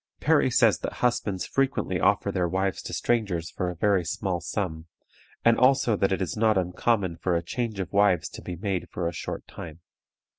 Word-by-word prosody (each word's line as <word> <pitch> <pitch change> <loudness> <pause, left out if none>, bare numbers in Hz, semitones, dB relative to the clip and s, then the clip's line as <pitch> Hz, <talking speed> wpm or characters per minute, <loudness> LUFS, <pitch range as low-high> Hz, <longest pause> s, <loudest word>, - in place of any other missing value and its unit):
Parry - - +3
says - - +4
that - - -4
husbands 105 -6 0
frequently 135 0 0
offer - - +2
their 90 -1 0
wives 95 +2 -1
to - - -7
strangers 100 -8 -1
for 90 - -2
a 90 - -5
very 100 0 +2
small 90 +1 -2
sum, 80 -2 -4 0.6
and 115 0 +5
also 130 -3 +4
that 95 -1 +1
it 95 0 0
is 90 - -4
not 110 -1 +3
uncommon 90 0 0
for 90 0 0
a 85 - 0
change 110 +3 -3
of 90 -1 -4
wives 100 -4 +3
to - - -10
be 90 - -6
made 95 0 -3
for 85 -1 -3
a 85 - -3
short - - -5
time. 80 0 -9
95 Hz, 195 wpm, -26 LUFS, 85-110 Hz, 0.6 s, and